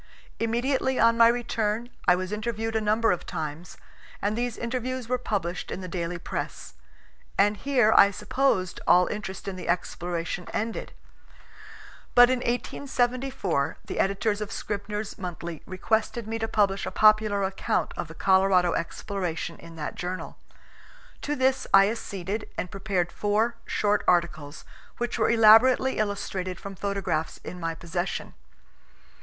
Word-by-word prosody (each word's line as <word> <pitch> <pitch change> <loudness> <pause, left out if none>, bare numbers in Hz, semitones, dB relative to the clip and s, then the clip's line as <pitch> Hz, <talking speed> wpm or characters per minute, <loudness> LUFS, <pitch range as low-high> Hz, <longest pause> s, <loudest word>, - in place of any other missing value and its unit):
Immediately 255 +3 0
on 230 0 +5
my 230 0 +7
return 230 -1 -1 0.2
I 180 - +7
was 185 +1 -4
interviewed 225 +1 -3
a 220 - +2
number 215 +2 +2
of 180 - -1
times, 155 +2 -6 0.4
and 205 +1 -1
these 240 0 -2
interviews 250 +1 -3
were 250 +1 0
published 185 -7 -3
in - - -5
the 185 - -6
daily 175 -1 -3
press; 170 - -5 0.6
and 205 +1 +4
here 240 0 +3
I 200 - +8
supposed 205 -2 0
all 180 0 +6
interest 200 -2 -5
in 190 -1 -4
the 180 - -7
exploration 175 0 -2
ended. 225 +1 -3 1.2
But 245 0 +8
in 255 - +1
1874 245 - -1
the - - -5
editors 205 +2 +1
of 210 - -4
Scribner's 210 +1 -4
Monthly 170 -3 -6
requested 220 +4 -1
me 225 +1 -3
to 225 - -1
publish 200 -3 +1
a - - 0
popular 215 -2 +4
account 190 0 -1
of - - -4
the 160 - -11
Colorado 190 -1 +3
exploration 170 -1 -3
in 165 0 -12
that 150 -2 -4
journal. 180 +1 -5 0.8
To 295 - -2
this 260 0 +1
I 195 0 +7
acceded 205 -2 -5
and 180 - -3
prepared 190 -3 -1
four 215 +3 +1
short 210 0 +1
articles, 165 -4 0 0.3
which 240 0 -2
were 220 - +3
elaborately 235 +3 +6
illustrated 195 -3 -2
from 200 - -7
photographs 190 -5 -2
in 180 - -7
my 165 -1 -2
possession. 175 +3 -4
205 Hz, 145 wpm, -26 LUFS, 180-230 Hz, 1.2 s, I